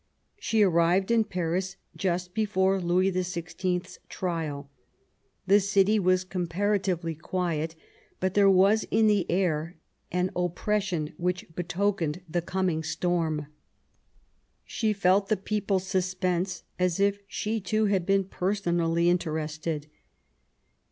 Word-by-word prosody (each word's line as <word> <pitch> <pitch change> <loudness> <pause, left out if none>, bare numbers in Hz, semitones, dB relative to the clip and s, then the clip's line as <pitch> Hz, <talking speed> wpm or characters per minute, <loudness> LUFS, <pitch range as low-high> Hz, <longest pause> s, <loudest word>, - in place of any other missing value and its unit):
She 220 -2 +2
arrived 180 +2 +3
in 225 -2 +4
Paris 185 0 -2 0.2
just 180 -1 -2
before 195 -3 +1
Louis 180 +2 +2
XVI/s 180 0 -3
trial. 160 -6 -3 0.8
The 200 +2 +6
city 200 +1 +3
was 185 -1 +2
comparatively 185 -1 -1
quiet, 165 -1 -2 0.4
but 185 0 0
there 200 -1 +5
was 195 +3 +5
in 220 +1 +2
the 205 -4 +2
air 170 -2 0 0.4
an 180 +1 0
oppression 180 -2 -1
which 180 +1 -1
betokened 180 -1 -1
the 170 +2 -1
coming 180 -2 -1
storm. 160 -1 -1 1.2
She 220 -2 -1
felt 195 0 +2
the 215 - +1
people's 195 -1 -1
suspense 185 -1 -1 0.2
as 180 0 +1
if 200 0 +2
she, 215 +2 -2
too, 215 +3 +1
had 195 -3 +1
been 195 +2 +2
personally 175 -3 0
interested. 155 -3 -1
185 Hz, 115 wpm, -27 LUFS, 170-195 Hz, 1.2 s, The